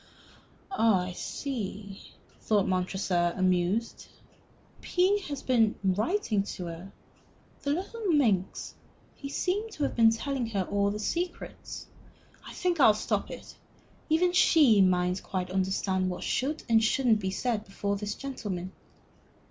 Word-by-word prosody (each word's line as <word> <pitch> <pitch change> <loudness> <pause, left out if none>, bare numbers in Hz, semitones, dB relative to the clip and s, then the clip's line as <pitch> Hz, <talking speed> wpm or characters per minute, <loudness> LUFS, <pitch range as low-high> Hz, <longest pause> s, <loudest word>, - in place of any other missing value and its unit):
"Ah, 225 - +3
I 180 - -5
see," 205 -2 -6 0.3
thought 205 -3 +1
Montresor, 185 -2 0
amused. 185 +4 0 0.7
"P 375 +3 +2
has 285 -2 -5
been 230 -4 +3
writing 210 - +1
to 190 -2 -6
her, 170 +3 -8 0.7
the 280 - -3
little 395 +8 -2
minx. 225 - +1 0.4
He 275 - -8
seems 410 +9 -2
to 295 - -2
have - - -1
been 225 -1 +6
telling 250 +2 -2
her 200 -4 -1
all 200 +2 0
the 205 - -3
secrets. 345 +11 -4 0.6
I - - -10
think 355 -3 -1
I'll 220 -6 +7
stop 215 - -2
it. - - -10 0.5
Even 350 +3 +3
she 290 - +5
mayn't 180 0 +2
quite 185 -1 -4
understand 190 0 0
what 180 - -5
should 295 +5 -1
and 225 -2 +4
shouldn't 225 -1 +3
be 190 -2 -2
said 215 +2 -1
before 200 0 -3
this 205 +1 -4
gentleman." 200 -9 -5
215 Hz, 135 wpm, -28 LUFS, 190-280 Hz, 0.7 s, I'll